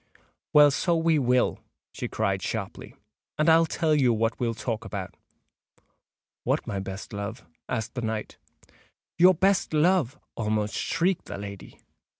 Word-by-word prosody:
"Well, 150 -1 +7
so 170 +5 +1
we 165 -1 +2
will," 125 -1 +2 0.3
she - - -5
cried 100 -3 -1
sharply; 100 -2 -5 0.4
"and 155 - +1
I'll 165 0 +6
tell 160 -1 +1
you 135 -5 +4
what 115 0 0
we'll 115 -2 -1
talk 115 -1 -3
about." 95 -3 -6 1.3
"What, - - 0
my 100 - -3
best 95 +2 -7
love?" 100 -1 -5 0.2
asked 110 - -3
the 125 - -4
knight. 110 -2 -4 0.8
"Your 180 +1 +7
best 190 -2 +2
love!" 155 -4 +2 0.2
almost 105 -1 -1
shrieked 180 +1 0
the - - -6
lady. 100 -1 -9
120 Hz, 145 wpm, -26 LUFS, 105-160 Hz, 1.3 s, Well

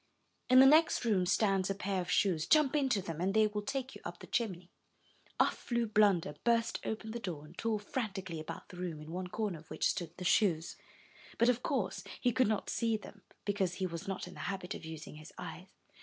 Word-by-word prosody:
In 255 0 +8
the 265 - +10
next 310 -1 +5
room 190 -5 +2
stands 195 +1 +2
a 195 - 0
pair 195 -1 -1
of 175 - -6
shoes. 170 -5 +2
Jump 305 -2 +4
into 265 -9 +2
them, 165 -2 -5
and 195 +3 0
they 220 0 +6
will 210 0 -2
take 260 +5 -3
you - - -11
up - - -6
the - - -11
chimney." 185 -7 -2 0.7
Off - - +4
flew 235 -1 -1
Blunder, 205 -7 +3
burst 230 -1 +2
open 220 0 -4
the 235 - -4
door, 170 -9 -5
and 160 +3 -15
tore 225 +1 -1
frantically 195 -6 -4
about 155 - -7
the 180 - -11
room, 175 -4 -4
in 150 +1 -9
one 180 +1 -3
corner 200 -3 -3
of 160 - -18
which - - +1
stood 170 -1 -3
the 180 - -6
shoes; 175 -5 +2 0.6
but 235 - +4
of 245 0 +2
course 250 -10 -1 0.2
he 245 - +2
could 255 +1 +3
not 215 -2 0
see 230 -2 +1
them, 210 -1 -13 0.2
because 195 -3 0
he 190 - -2
was 170 +2 -5
not 195 -2 -3
in 180 - -10
the - - -12
habit 190 -1 -4
of - - -8
using 160 -1 -8
his 155 - -11
eyes. - - -7
195 Hz, 225 wpm, -33 LUFS, 180-225 Hz, 0.7 s, the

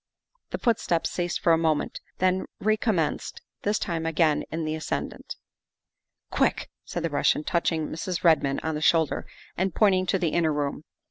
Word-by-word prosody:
The - - -3
footsteps 215 -8 +1
ceased 175 -1 -2
for 170 - +4
a 165 - +3
moment, 160 -2 0 0.2
then 185 0 +1
recom 215 0 +1
menced, 160 -3 -1 0.3
this 205 +1 +1
time 165 -2 -2
again 160 -2 +2
in 160 0 -3
the 155 - -1
ascendant. 155 0 -4 0.5
" - - -56
Quick!" - - +1
said 175 - -4
the 165 - -1
Russian, 145 +1 +2
touching 165 -1 0
Mrs. 165 +2 -4
Redmond 150 -5 +3
on 160 - -1
the 150 - -3
shoulder 160 -1 +2 0.3
and 190 0 -1
pointing 185 -3 +3
to 195 - +2
the 175 -3 0
inner 160 -1 +2
room. 145 0 -2
165 Hz, 175 wpm, -26 LUFS, 155-185 Hz, 0.5 s, for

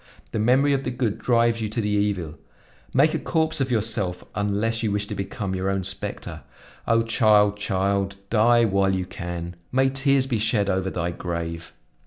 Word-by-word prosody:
The 110 - -2
memory 130 +6 +3
of 135 0 0
the - - -2
good 120 -4 -2
drives 115 -1 +2
you 110 - -2
to 110 - -3
the 105 - -1
evil; 100 -6 -1 0.5
make 145 +4 +3
a - - 0
corpse 160 -2 0
of 135 - 0
yourself 105 -6 0
unless 105 +3 -1
you 110 -3 0
wish 105 0 -1
to - - -6
become 100 0 -4
your 95 +1 -1
own 95 -1 -1
specter. 95 +2 -4 0.5
O 115 0 +3
child, 105 -2 +4
child! 100 -1 -1 0.2
die 120 +1 +4
while 95 -2 +2
you 95 -1 -2
can! 85 -1 -6 0.2
May 135 +1 +2
tears 135 0 +2
be 120 -5 -1
shed 105 -2 +2
over 95 0 -1
thy 85 -1 -2
grave!" 85 -1 -5
105 Hz, 185 wpm, -24 LUFS, 95-120 Hz, 0.5 s, child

